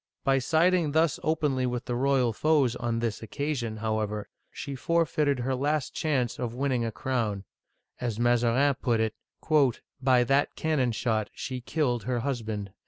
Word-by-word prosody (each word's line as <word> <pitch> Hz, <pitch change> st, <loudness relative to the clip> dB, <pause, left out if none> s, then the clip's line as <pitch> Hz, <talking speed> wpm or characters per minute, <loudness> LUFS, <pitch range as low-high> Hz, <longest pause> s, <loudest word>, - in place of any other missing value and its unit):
By 135 Hz, 0 st, +3 dB
siding 160 Hz, +3 st, +2 dB
thus 160 Hz, -1 st, +2 dB
openly 145 Hz, -5 st, +1 dB
with 125 Hz, 0 st, -3 dB
the 120 Hz, -, -3 dB
royal 130 Hz, -2 st, +2 dB
foes 140 Hz, -2 st, +2 dB
on 120 Hz, -1 st, -2 dB
this 115 Hz, -3 st, -2 dB
occasion, 120 Hz, -2 st, -3 dB
however, 105 Hz, -1 st, -2 dB, 0.2 s
she 140 Hz, -, -6 dB
forfeited 150 Hz, -2 st, +1 dB
her 130 Hz, +2 st, -1 dB
last 145 Hz, +2 st, -1 dB
chance 130 Hz, -7 st, -1 dB
of 120 Hz, -2 st, -3 dB
win 140 Hz, +2 st, 0 dB
ning 125 Hz, -2 st, +1 dB
a 115 Hz, -, -2 dB
crown; 110 Hz, -6 st, -2 dB, 0.6 s
as 115 Hz, -3 st, -3 dB
Maza 120 Hz, 0 st, +3 dB
rin 140 Hz, +4 st, +3 dB
put 120 Hz, -4 st, +1 dB
it, 110 Hz, -1 st, 0 dB, 0.7 s
" -, -, -44 dB
By 130 Hz, -2 st, +4 dB
that 135 Hz, +3 st, +1 dB
cannon 145 Hz, -6 st, +1 dB
shot 110 Hz, -2 st, -1 dB
she 130 Hz, -1 st, -5 dB
killed 120 Hz, -5 st, -1 dB
her 125 Hz, -1 st, -1 dB
husband 110 Hz, -6 st, -3 dB
125 Hz, 170 wpm, -28 LUFS, 115-140 Hz, 0.7 s, By